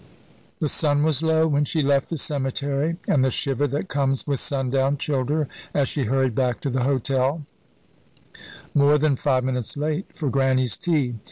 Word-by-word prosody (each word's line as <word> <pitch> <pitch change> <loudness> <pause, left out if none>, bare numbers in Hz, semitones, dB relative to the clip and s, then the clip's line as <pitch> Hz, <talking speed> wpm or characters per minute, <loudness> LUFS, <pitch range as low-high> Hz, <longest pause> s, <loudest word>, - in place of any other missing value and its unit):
The 155 - -1
sun 145 0 +2
was 155 -2 +2
low 160 0 +2
when 145 -1 +1
she 155 +1 0
left 140 0 +1
the 165 - -3
cemetery, 140 +3 -1
and 135 - +3
the 130 - +3
shiver 135 +2 0
that 145 +7 -3
comes 135 -3 0
with 140 -3 -1
sundown 135 0 0
chilled 135 -3 -1
her 150 -1 0 0.3
as 140 -2 +2
she 140 -4 -1
hurried 130 +1 +1
back 125 -2 0
to 140 - -2
the 130 0 0
hotel, 135 +2 0 1.3
more 145 +1 +4
than 150 -1 +2
five 130 -1 +1
minutes 125 0 -2
late 155 +5 -2
for 145 -6 -2
Grannie's 130 -2 +2
tea. 140 -9 -1
140 Hz, 175 wpm, -23 LUFS, 130-150 Hz, 1.3 s, more